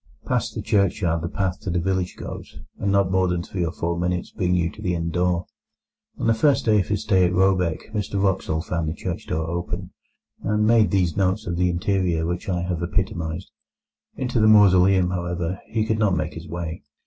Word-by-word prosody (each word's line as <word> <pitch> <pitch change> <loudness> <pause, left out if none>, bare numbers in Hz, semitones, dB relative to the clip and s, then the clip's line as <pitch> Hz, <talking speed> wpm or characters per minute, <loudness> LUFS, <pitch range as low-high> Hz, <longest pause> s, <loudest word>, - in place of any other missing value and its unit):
Past - - -1
the - - -4
churchyard 90 -4 +1
the 85 - -3
path 95 -2 -2
to - - -5
the 90 - 0
village 95 0 -1
goes, - - -8 0.2
and 100 - 0
not 100 -2 +2
more 95 0 +3
than 90 -1 -1
three 90 -1 -3
or 85 - -1
four 85 +1 -2
minutes 90 0 -1
bring 90 -1 0
you 85 -1 +1
to - - -12
the 90 -1 0
inn 85 0 -2
door. 90 0 0 0.7
On - - -3
the 115 - +4
first 140 +5 +2
day 110 -2 +4
of 95 - -1
his 105 -1 -1
stay 95 -4 +3
at 90 - +3
Råbäck 90 -3 +1
Mr 100 -2 -2
Wraxall 95 -5 0
found 85 -3 -2
the 80 - -4
church - - -5
door 80 0 -2
open, 85 +2 -4 0.5
and 105 +1 +1
made 110 -1 +5
those 90 -5 +1
notes 95 +2 +1
of 85 - -2
the 90 +1 +2
interior 90 -2 0
which 90 +4 -3
I 90 -2 0
have 90 -2 -2
epitomized. 85 -2 -2 0.6
Into 125 -2 -1
the 110 - +5
mausoleum, 95 -3 +5
however, 85 +1 -2
he 110 -1 -1
could 110 0 0
not 100 -4 +2
make 75 +2 -2
his 80 +1 -9
way. 85 +2 -5
90 Hz, 210 wpm, -23 LUFS, 85-100 Hz, 0.7 s, made